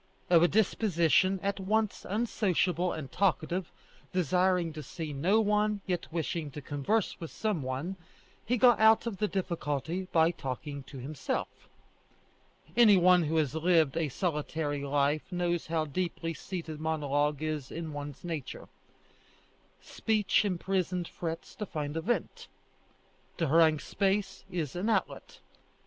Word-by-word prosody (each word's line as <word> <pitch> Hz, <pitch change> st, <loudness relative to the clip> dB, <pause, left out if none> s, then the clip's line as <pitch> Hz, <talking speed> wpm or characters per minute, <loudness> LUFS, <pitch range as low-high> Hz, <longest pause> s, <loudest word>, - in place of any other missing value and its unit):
Of 170 Hz, -2 st, +7 dB
a 175 Hz, -, +6 dB
disposition 190 Hz, -3 st, +2 dB
at 200 Hz, 0 st, -1 dB
once 215 Hz, +2 st, -1 dB
unsociable 185 Hz, -5 st, +1 dB
and 150 Hz, -4 st, -6 dB
talkative, 180 Hz, -2 st, 0 dB, 0.4 s
desiring 180 Hz, -1 st, +1 dB
to 155 Hz, -, -6 dB
see 155 Hz, +1 st, -6 dB
no 180 Hz, +10 st, +2 dB
one, 210 Hz, -1 st, +1 dB
yet 180 Hz, -3 st, -3 dB
wishing 160 Hz, -1 st, -2 dB
to -, -, -6 dB
converse 145 Hz, +10 st, -1 dB
with 165 Hz, -, -6 dB
some 210 Hz, -8 st, -2 dB
one, 135 Hz, +9 st, -4 dB, 0.5 s
he 250 Hz, +3 st, 0 dB
got 240 Hz, 0 st, +6 dB
out 220 Hz, +1 st, +6 dB
of 230 Hz, -5 st, -3 dB
the 210 Hz, -, +1 dB
difficulty 170 Hz, -2 st, -2 dB
by 160 Hz, 0 st, +4 dB
talking 140 Hz, -1 st, -5 dB
to 135 Hz, -, -10 dB
himself. 140 Hz, +4 st, -4 dB, 1.1 s
Any 220 Hz, -5 st, +7 dB
one 180 Hz, 0 st, +6 dB
who 155 Hz, +2 st, -1 dB
has 150 Hz, -4 st, +1 dB
lived 160 Hz, -3 st, +3 dB
a 165 Hz, -3 st, 0 dB
solitary 150 Hz, -2 st, -2 dB
life 145 Hz, +4 st, 0 dB
knows 175 Hz, -1 st, -1 dB
how 160 Hz, -1 st, 0 dB
deeply 165 Hz, +2 st, -3 dB
seated 165 Hz, -3 st, -6 dB
monologue 150 Hz, -2 st, 0 dB
is 155 Hz, -4 st, -3 dB
in 160 Hz, -2 st, -5 dB
one's 145 Hz, -1 st, -7 dB
nature. 160 Hz, -6 st, -5 dB, 1.2 s
Speech 215 Hz, -3 st, +1 dB
imprisoned 180 Hz, -2 st, -1 dB
frets 165 Hz, -1 st, -6 dB
to 210 Hz, -, -5 dB
find 150 Hz, -2 st, -4 dB
a 165 Hz, -, -1 dB
vent. 240 Hz, +8 st, -2 dB, 0.9 s
To 165 Hz, -4 st, 0 dB
harangue 160 Hz, 0 st, +5 dB
space 195 Hz, +1 st, -1 dB
is 165 Hz, -6 st, -3 dB
an 190 Hz, +6 st, -1 dB
outlet. 220 Hz, -, -2 dB
170 Hz, 140 wpm, -30 LUFS, 155-190 Hz, 1.2 s, Of